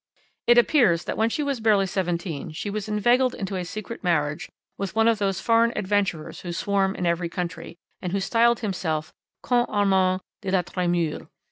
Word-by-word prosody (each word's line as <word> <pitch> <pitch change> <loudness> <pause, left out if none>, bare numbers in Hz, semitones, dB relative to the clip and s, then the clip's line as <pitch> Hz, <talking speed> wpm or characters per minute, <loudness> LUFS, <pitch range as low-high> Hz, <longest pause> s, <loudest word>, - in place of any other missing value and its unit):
"It 240 0 +6
appears 235 - +4
that - - -3
when 225 +1 +2
she 295 - -2
was 280 -3 -1
barely 215 -3 +3
seventeen 175 -5 -3
she 200 +6 -4
was 215 +1 -4
inveigled 240 +5 +2
into 195 -1 -4
a 185 - -2
secret 215 +5 -7
marriage 150 -4 0 0.3
with 195 -1 -5
one 225 0 +4
of 230 -2 +3
those 195 -2 0
foreign 230 0 +3
adventurers 195 -5 -1
who 175 -1 -6
swarm 195 +1 0
in 180 - -3
every 170 0 0
country, 170 -1 -5 0.2
and 180 - -3
who 200 - 0
styled 235 +4 +2
himself 165 -7 -2 0.3
Comte 240 -1 +1
Armand 190 -2 +2 0.2
de 195 - -4
la 185 -1 +2
Tremouille. 175 -3 -1
195 Hz, 180 wpm, -24 LUFS, 175-220 Hz, 0.3 s, It